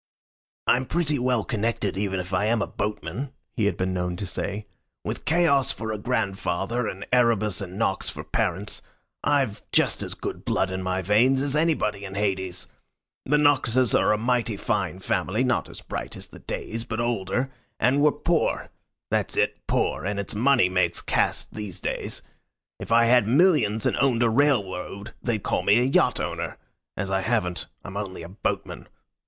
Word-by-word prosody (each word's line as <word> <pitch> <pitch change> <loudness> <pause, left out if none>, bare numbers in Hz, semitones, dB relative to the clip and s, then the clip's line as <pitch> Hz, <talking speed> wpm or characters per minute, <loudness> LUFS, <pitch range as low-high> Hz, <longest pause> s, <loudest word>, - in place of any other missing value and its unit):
"I'm 130 +1 +3
pretty 155 -4 +1
well 125 -3 +1
connected 110 -3 -1
even 95 -1 -1
if 90 +1 -6
I 95 +3 +2
am 115 +1 +2
a - - 0
boatman," 105 - -4 0.2
he 115 -3 0
had 100 - +1
been 95 0 -1
known 90 -1 -1
to 100 - -4
say. 100 +3 -4 0.4
"With - - -4
Chaos 155 -5 +3
for 110 0 -3
a 105 - -3
grandfather, 100 0 -1
and 95 0 -5
Erebus 110 -5 +3
and 95 0 -6
Nox 100 -3 0
for - - -6
parents, 100 +4 -1 0.4
I've 140 -8 +1
just - - +2
as - - -5
good - - -5
blood 95 - 0
in 95 0 -3
my 95 0 -1
veins 120 +8 +4
as 140 0 -1
anybody 145 -11 +1
in 95 0 -7
Hades. 95 -3 -1 0.6
The 150 +3 +4
Noxes 130 -4 +3
are - - +4
a 105 - +3
mighty 115 -1 0
fine - - -1
family, 110 +7 0
not 125 -2 0
as - - -9
bright - - -5
as - - -10
the - - -12
Days, 115 +1 -4
but 115 -1 -4
older; 120 +2 -1 0.3
and 130 +5 +3
we're 150 0 +6
poor 165 +3 0 0.4
that's - - 0
it, - - +1
poor - - 0
and 100 +2 -2
it's 100 - -4
money 120 0 +4
makes 90 0 +1
caste - - 0
these 105 -4 -6
days. - - -3 0.6
If - - -7
I 115 +1 +6
had 120 -2 +5
millions, 125 - +4
and - - +2
owned 125 -4 +3
a 115 - +3
railroad, 105 -6 0
they'd 115 -5 -1
call - - +1
me 105 - +4
a - - +3
yacht 130 - +3
owner. - - -3 0.4
As 95 -1 -2
I 95 0 +2
haven't, 95 -5 -1 0.2
I'm 95 - -8
only 95 -4 -5
a 85 - -8
boatman. 95 - -4
110 Hz, 180 wpm, -25 LUFS, 95-125 Hz, 0.6 s, we're